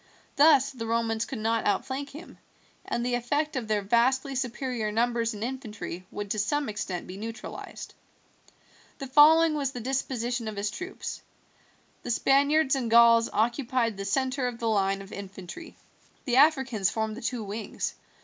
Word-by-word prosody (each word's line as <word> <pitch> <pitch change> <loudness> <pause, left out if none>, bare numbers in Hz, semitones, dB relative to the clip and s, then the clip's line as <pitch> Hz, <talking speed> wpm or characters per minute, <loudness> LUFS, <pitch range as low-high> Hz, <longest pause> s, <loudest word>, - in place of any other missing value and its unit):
Thus 280 -2 +5
the 230 -4 -6
Romans 225 -1 0
could 265 - -6
not 225 +1 0
outflank 260 +7 -1
him, 305 +5 -12 0.5
and 235 - -2
the 245 - -1
effect 285 +6 -1
of 245 -4 -3
their 210 -2 0
vastly 260 +6 +2
superior 250 -3 -2
numbers 230 0 0
in 210 - -5
infantry 215 -8 -6
would 205 -1 -6
to 215 - -1
some 285 +5 0
extent 195 -4 -4
be 185 +1 -8
neutralized. 225 +2 -8 1.0
The 275 - -6
following 310 +4 +6
was 280 -3 -1
the 245 - -5
disposition 245 -2 -2
of 215 - -4
his 200 +1 -2
troops. 370 - -6 0.8
The - - -7
Spaniards 280 +4 +3
and 250 -4 -2
Gauls 230 0 +6
occupied 235 0 0
the 195 0 -5
centre 260 +5 0
of 245 -1 -5
the 230 -1 -1
line 195 -2 +1
of 195 - -14
infantry. 195 - -9 0.5
The 250 -3 +1
Africans 265 - +4
formed 220 0 -2
the 245 - -8
two 230 0 -3
wings. 210 +2 -4
235 Hz, 160 wpm, -27 LUFS, 215-270 Hz, 1.0 s, following